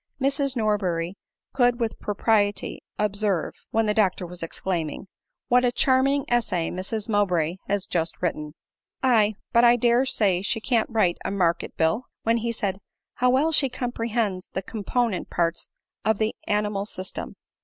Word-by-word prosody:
Mrs 275 0 +1
Norberry 190 -5 0 0.4
could 245 -2 +3
with 230 -2 -2
propriety 205 0 0 0.2
observe, 200 -4 0 0.2
when 225 0 +1
the 210 - +2
doctor 195 -4 +1
was 175 0 -9
exclaiming, 165 +1 -3 0.2
" - - -59
What 250 +1 +4
a 245 - +3
charming 270 +2 +2
essay 210 -9 0
Mrs 200 +4 -4
Mowbray 180 -6 +1
has 200 -1 0
just 165 -3 -2
written!" 150 -3 -3 0.2
" - - -50
Aye— 220 -5 +4 0.2
but 235 - +5
I 240 0 +7
dare 245 +2 +3
say 195 -7 +2
she 220 +3 -1
can't 225 -1 +1
write 215 -7 +1
a - - -2
market 175 -4 0
bill." 165 +10 +1 0.2
When 230 +1 +2
he 235 +1 -1
said, 195 -4 -2 0.3
"How 250 - +2
well 275 +6 +3
she 280 -3 +4
comprehends 230 -6 -2
the 190 - -2
component 225 +1 -1
parts 170 -1 -1 0.3
of 220 0 +2
the 220 +1 0
animal 210 -1 0
system 185 -2 -5
210 Hz, 160 wpm, -25 LUFS, 185-240 Hz, 0.4 s, I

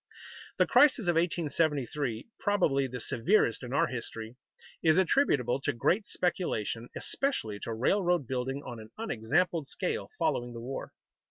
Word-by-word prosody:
The - - +5
crisis 265 -8 +5
of 175 - +4
1873, 150 -7 0
probably 160 -10 +2
the 125 0 -6
severest 120 - +2
in 125 -1 -7
our 140 - +3
history, 115 -1 -6 0.5
is 160 0 +4
attributable 150 - +3
to 145 - 0
great 185 - +1
speculation, 120 - -2
especially 110 - -2
to 115 - -4
railroad 175 - +2
building 130 +3 -3
on 120 -2 -7
an 110 0 -11
unexampled 165 - 0
scale - - -3
following 120 0 0
the 115 - -7
war. 130 +3 -6
140 Hz, 140 wpm, -30 LUFS, 120-175 Hz, 0.5 s, The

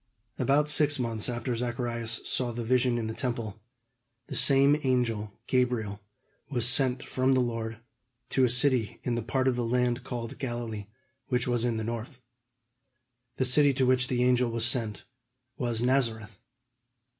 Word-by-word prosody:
About 140 +4 +2
six 150 -1 +4
months 115 -4 -2
after 120 +1 -3
Zacharias 120 -1 -3
saw 125 -2 -1
the 120 0 -5
vision 125 +1 +2
in 115 - -2
the 110 - -3
Temple, 115 -4 -4 0.6
the - - -7
same 140 +1 +5
angel 115 -6 0
Gabriel 120 -6 0 0.5
was 120 -4 +2
sent 130 0 +4
from 130 +1 +1
the 130 - +3
Lord 115 -2 -2 0.5
to 130 - +2
a 125 - +4
city 125 -2 +2
in 125 - -1
the 120 - -1
part 130 +3 -1
of 130 - +2
the 120 - -1
land 125 +1 0
called 120 -3 -6
Galilee, 120 -5 -4 0.4
which 125 -1 0
was 120 -2 +1
in 120 -2 0
the 110 - -3
north. 115 +3 -5 1.2
The 130 - +1
city 140 +2 +4
to 130 - +2
which 125 0 +2
the 125 -1 0
angel 125 -1 +3
was 115 0 0
sent 115 -4 -2 0.5
was 120 -2 -2
Nazareth. 115 -5 0
120 Hz, 160 wpm, -28 LUFS, 115-130 Hz, 1.2 s, same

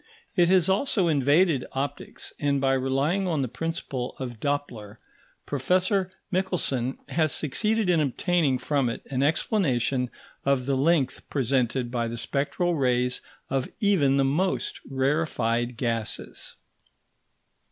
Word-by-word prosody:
It 175 -2 +4
has 185 -2 +4
also 195 -1 +2
invaded 145 0 +3
optics; 135 0 -4
and 140 -1 +1
by 135 0 +2
relying 135 +9 +1
on 155 -6 0
the - - -1
principle 130 -2 -4
of 120 -4 -6
Doppler, 120 -7 -3 0.5
Professor 185 - +1 0.2
Michelson 175 -9 -1
has 155 -2 +1
succeeded 215 - 0
in 175 -2 +4
obtaining 150 0 +1
from 135 0 0
it 115 - -5
an 130 -1 0
explanation 135 - +1 0.3
of 135 -2 +1
the 135 0 +1
length 140 -1 +1
presented 130 -2 0
by 120 -2 -1
the 115 +1 -5
spectral 150 +8 0
rays 125 -4 +1 0.3
of 135 -1 -1
even 175 - +3
the 135 - +3
most 175 +8 0
rarefied 130 -4 0
gases. 115 -3 -3
140 Hz, 125 wpm, -26 LUFS, 125-170 Hz, 0.5 s, It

